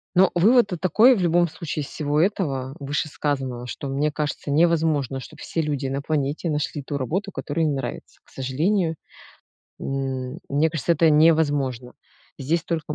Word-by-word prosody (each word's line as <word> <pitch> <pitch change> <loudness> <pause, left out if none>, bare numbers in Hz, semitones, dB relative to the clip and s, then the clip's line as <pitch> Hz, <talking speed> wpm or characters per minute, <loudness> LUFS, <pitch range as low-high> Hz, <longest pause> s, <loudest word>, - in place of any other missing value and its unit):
Ну, 190 +2 +6
вывод 230 +6 +5
тут 180 -4 -5
такой 220 - +5
в - - -2
любом 175 0 +3
случае, 155 -1 -5
из - - -8
всего 150 0 0
этого, 140 -9 -1
вышесказанного, 140 -3 -2
что: 135 +3 -6
мне 145 +3 0
кажется, 150 -1 -3
невозможно, 155 -4 +2
чтоб - - -12
все 165 - -2
люди 145 -3 -2
на 135 +1 -2
планете 150 +2 -1
нашли 150 0 -2
ту 140 +1 -3
работу, 190 - -2
которая 160 -2 -2
им 150 - +1
нравится. 135 - -6
К - - -26
сожалению, 160 +7 0 0.8
м, 135 0 -3
мне 150 +3 +2
кажется, 160 +1 0
это 165 0 +4
невозможно. 145 -6 +2 0.5
Здесь 160 +5 -1
только 160 -3 -3
150 Hz, 160 wpm, -23 LUFS, 135-165 Hz, 0.8 s, Ну